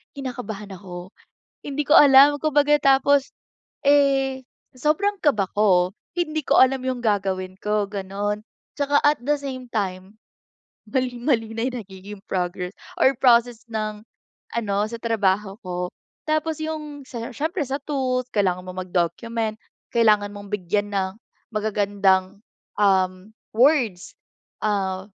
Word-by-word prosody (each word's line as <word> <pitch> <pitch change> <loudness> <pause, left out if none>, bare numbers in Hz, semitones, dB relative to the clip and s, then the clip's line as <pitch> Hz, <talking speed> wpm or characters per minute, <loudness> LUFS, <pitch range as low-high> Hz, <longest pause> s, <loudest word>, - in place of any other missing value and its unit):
kinakabahan 235 -7 -6
ako. 180 -1 -9 0.5
Hindi 285 0 -3
ko 300 - +6
alam 280 +1 +8
kumbaga 295 -1 +4
tapos, 275 0 +4 0.6
eh, 270 -2 +3 0.3
sobrang 310 +10 +1
kaba 210 -10 +2
ko, 190 -2 +3 0.2
hindi 310 -3 -1
ko - - +3
alam 260 0 +4
yung 255 -1 -2
gagawin 190 -4 -1
ko 210 -1 0
ganun. 205 +1 -3 0.3
Tsaka 285 0 +2
at 295 - +3
the 295 +1 +1
same 255 -3 -7
time, 195 0 -4 0.7
mali-mali 245 -3 0
na 225 - -2
yung 250 - -5
nagiging 195 +1 -11
progress, 180 0 -3 0.2
or 265 +1 +4
process 240 -2 +3
ng, 215 -1 -3 0.5
ano 205 -4 -1
sa 235 - -6
trabaho 210 -3 0
ko. 180 -1 -4 0.4
Tapos 310 0 0
yung 300 -3 -5
siyempre 270 - -4
sa 270 +2 -2
tools, 255 -3 -1
kailangan 185 -3 0
mong 185 0 -5
mag-document, 215 +6 -1 0.4
kailangan 210 -3 +3
mong 205 0 -10
bigyan 205 +1 -1
ng 190 -1 0 0.4
magagandang, 200 -2 +1 0.4
um, 185 0 +2 0.2
words, 235 - +2 0.5
ah, 190 -2 -1
220 Hz, 120 wpm, -23 LUFS, 195-270 Hz, 0.7 s, alam